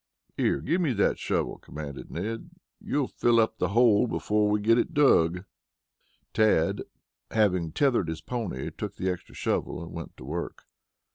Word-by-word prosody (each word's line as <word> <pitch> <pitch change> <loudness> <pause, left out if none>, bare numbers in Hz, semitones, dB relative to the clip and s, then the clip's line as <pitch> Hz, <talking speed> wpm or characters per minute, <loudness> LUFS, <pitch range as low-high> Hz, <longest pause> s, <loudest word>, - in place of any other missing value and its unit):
"Here, - - +1
give 175 +3 0
me 150 -7 +1
that 100 - +1
shovel," - - -1
commanded 75 -2 -8
Ned. 110 - -4 0.3
"You'll 145 -3 -1
fill 120 -1 +2
up 110 0 +1
the 90 - +2
bole 115 +2 +4
before 105 -2 +1
we 105 0 +2
get 115 +3 +4
it 165 - -2
dug." 90 - +4 0.9
Tad, 110 -1 +3 0.5
having 90 -7 +1
tethered 135 - +2
his 80 0 -4
pony, 95 - -4
took - - -5
the 95 0 -1
extra 90 - -8
shovel - - -1
and - - -9
went - - -8
to 65 - -10
work. 85 +5 -5
105 Hz, 160 wpm, -27 LUFS, 85-120 Hz, 0.9 s, bole